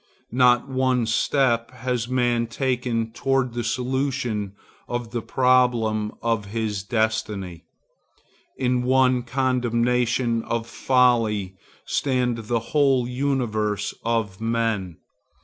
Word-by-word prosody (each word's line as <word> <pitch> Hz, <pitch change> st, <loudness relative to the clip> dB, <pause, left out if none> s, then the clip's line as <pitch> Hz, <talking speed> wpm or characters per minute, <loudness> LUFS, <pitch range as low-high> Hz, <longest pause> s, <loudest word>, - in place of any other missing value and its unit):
Not 120 Hz, 0 st, +4 dB
one 130 Hz, -2 st, +1 dB
step 115 Hz, +1 st, +1 dB
has 125 Hz, -2 st, -3 dB
man 120 Hz, -2 st, +1 dB
taken 120 Hz, -2 st, -1 dB
toward 135 Hz, 0 st, 0 dB
the 120 Hz, 0 st, -3 dB
solution 125 Hz, -4 st, -2 dB, 0.3 s
of 120 Hz, -2 st, -4 dB
the 120 Hz, -1 st, -2 dB
problem 120 Hz, -4 st, +2 dB
of 115 Hz, -3 st, 0 dB
his 105 Hz, -1 st, -3 dB
destiny. 105 Hz, -5 st, -2 dB, 0.9 s
In 125 Hz, -1 st, +1 dB
one 130 Hz, 0 st, +3 dB
condemnation 125 Hz, -1 st, +1 dB
of 115 Hz, -1 st, -2 dB
folly 115 Hz, -6 st, +2 dB, 0.3 s
stand 125 Hz, -5 st, -1 dB
the 120 Hz, -, +1 dB, 0.2 s
whole 135 Hz, -5 st, +3 dB
universe 120 Hz, -6 st, -1 dB
of 110 Hz, -4 st, -1 dB
men. 115 Hz, -7 st, -1 dB
120 Hz, 100 wpm, -23 LUFS, 110-125 Hz, 0.9 s, Not